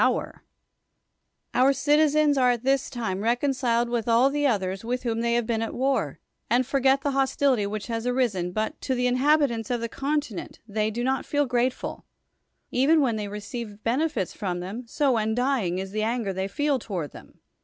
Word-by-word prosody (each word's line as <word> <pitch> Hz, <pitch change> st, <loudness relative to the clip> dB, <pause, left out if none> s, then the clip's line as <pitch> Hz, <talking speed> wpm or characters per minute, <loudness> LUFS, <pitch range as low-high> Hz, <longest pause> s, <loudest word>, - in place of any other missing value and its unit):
94 -, -, +3 dB
ISOCRATES -, -, -14 dB, 1.1 s
Our 260 Hz, +2 st, +4 dB
citizens 295 Hz, +1 st, +3 dB
are 250 Hz, -1 st, +4 dB
at 240 Hz, -1 st, 0 dB
this 270 Hz, 0 st, +1 dB
time 220 Hz, -6 st, -3 dB
reconciled 240 Hz, 0 st, +1 dB
with 235 Hz, -2 st, -2 dB
all 240 Hz, +4 st, +4 dB
the 290 Hz, 0 st, +1 dB
others 190 Hz, -5 st, -1 dB
"svilh 250 Hz, +2 st, -3 dB
whom 230 Hz, -2 st, -1 dB
ilu -, -, -1 dB
y 235 Hz, -, 0 dB
have 240 Hz, -1 st, +1 dB
been 225 Hz, -1 st, -1 dB
at 225 Hz, -, -3 dB
war, 270 Hz, +1 st, 0 dB, 0.3 s
and 245 Hz, +2 st, +3 dB
foriiet 270 Hz, +1 st, +2 dB
the 285 Hz, -, 0 dB
liostility 270 Hz, -4 st, +2 dB
wliich 210 Hz, 0 st, -4 dB
has 230 Hz, 0 st, -3 dB
arisen, 230 Hz, -9 st, 0 dB
hnit 215 Hz, +3 st, -1 dB
to 260 Hz, -, -1 dB
the 250 Hz, 0 st, 0 dB
inhabitants 255 Hz, -3 st, +2 dB
of 245 Hz, -1 st, 0 dB
tlie 230 Hz, 0 st, -4 dB
continent 280 Hz, -, -3 dB
they 215 Hz, 0 st, 0 dB
do 235 Hz, +3 st, -3 dB
not 265 Hz, +1 st, 0 dB
feel 290 Hz, 0 st, +1 dB
grateful, 250 Hz, 0 st, -2 dB, 0.6 s
even 285 Hz, +6 st, +4 dB
when 255 Hz, -6 st, +2 dB
they 210 Hz, -1 st, -3 dB
receive 210 Hz, +1 st, -7 dB
benefits 250 Hz, -, 0 dB
ffrivu 180 Hz, -4 st, -3 dB
them], 210 Hz, +7 st, -6 dB
so 270 Hz, 0 st, +1 dB
undying 220 Hz, -3 st, 0 dB
is 190 Hz, 0 st, -4 dB
th.e 215 Hz, +1 st, -2 dB
anger 225 Hz, -3 st, -1 dB
they 190 Hz, +1 st, -2 dB
feel 285 Hz, +6 st, 0 dB
toward 180 Hz, -, -4 dB
them. -, -, -14 dB
240 Hz, 190 wpm, -26 LUFS, 215-270 Hz, 1.1 s, Our